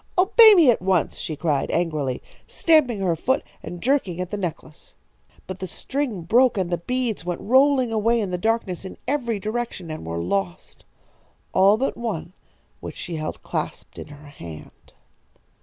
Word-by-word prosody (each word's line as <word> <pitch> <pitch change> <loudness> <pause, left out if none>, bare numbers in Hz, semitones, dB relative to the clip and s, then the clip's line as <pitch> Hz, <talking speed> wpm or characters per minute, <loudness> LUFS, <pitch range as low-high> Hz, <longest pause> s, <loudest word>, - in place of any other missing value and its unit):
"'Obey 425 +4 +8
me 320 -9 +7
at 225 - -1
once!' 185 -3 +1
she 155 - -4
cried, 150 -2 -1
angrily, 155 -7 -1 0.2
stamping 270 -11 +2
her 175 -3 +1
foot 260 - 0 0.2
and 175 -1 -8
jerking 240 -10 +1
at 180 0 -4
the - - -2
necklace. 165 -4 -7 0.5
But 185 0 -7
the 185 - -4
string 245 - -3
broke 240 +7 +3
and 180 -2 -1
the 175 - 0
beads 245 0 -2
went 175 0 -3
rolling 260 0 +3
away 225 +2 +2
in 200 -4 -2
the 180 - -1
darkness 220 -4 -1
in 190 - -9
every 245 -6 -1
direction, 215 -5 -4
and 155 - -6
were 85 +1 -4
lost. 180 - -3 0.7
All 195 +3 +5
but 265 +4 -1
one, 205 -7 -4 0.5
which - - -8
she 170 -3 -5
held 155 0 -5
clasped - - -5
in - - -8
her 145 0 -13
hand. 85 - -12
195 Hz, 170 wpm, -23 LUFS, 170-245 Hz, 0.7 s, Obey